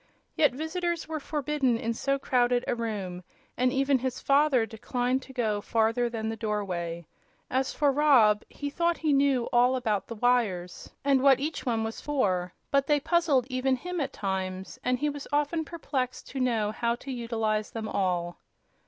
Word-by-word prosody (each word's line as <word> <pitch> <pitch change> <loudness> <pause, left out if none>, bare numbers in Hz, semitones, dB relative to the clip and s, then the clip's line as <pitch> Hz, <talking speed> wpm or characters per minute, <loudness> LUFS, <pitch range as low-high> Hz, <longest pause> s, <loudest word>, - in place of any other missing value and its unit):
Yet 295 -5 +4
visitors 335 +4 -2
were 320 -1 -3
forbidden 290 -4 0
in 230 0 -2
so 275 +4 0
crowded 245 -2 +1
a - - +1
room, 205 -6 -4 0.3
and 250 +1 +2
even 270 0 +2
his 255 0 -3
father 275 -4 +3
declined 245 +4 -1
to 265 - -12
go 220 -5 -1
farther 230 +3 +1
than 225 -2 -4
the 225 - -2
doorway. 185 -6 -3 0.5
As 260 +1 +1
for 290 -2 +2
Rob, 255 -8 +5
he 285 -1 -5
thought 340 +2 +1
he 310 -2 +1
knew 275 -3 +3
all 245 +2 +4
about 220 -6 -1
the 230 - -6
wires, 210 -7 0
and 275 -2 +4
what 270 -1 +6
each 300 -1 -4
one 225 -2 +1
was 225 0 -5
for; 185 -11 0 0.2
but 275 -1 +2
they 295 -1 +3
puzzled 315 -5 +2
even 260 +1 +1
him, 360 +5 -4
at 275 -1 -2
times, 190 -1 -4
and 250 0 +1
he 295 - -1
was 290 -1 -5
often 295 +3 +1
perplexed 280 -5 -4
to 270 - -5
know 230 -5 +1
how 235 +1 0
to 270 +3 -8
utilize 225 -3 -1
them 225 -1 -5
all. 180 -4 -1
250 Hz, 180 wpm, -28 LUFS, 220-280 Hz, 0.5 s, what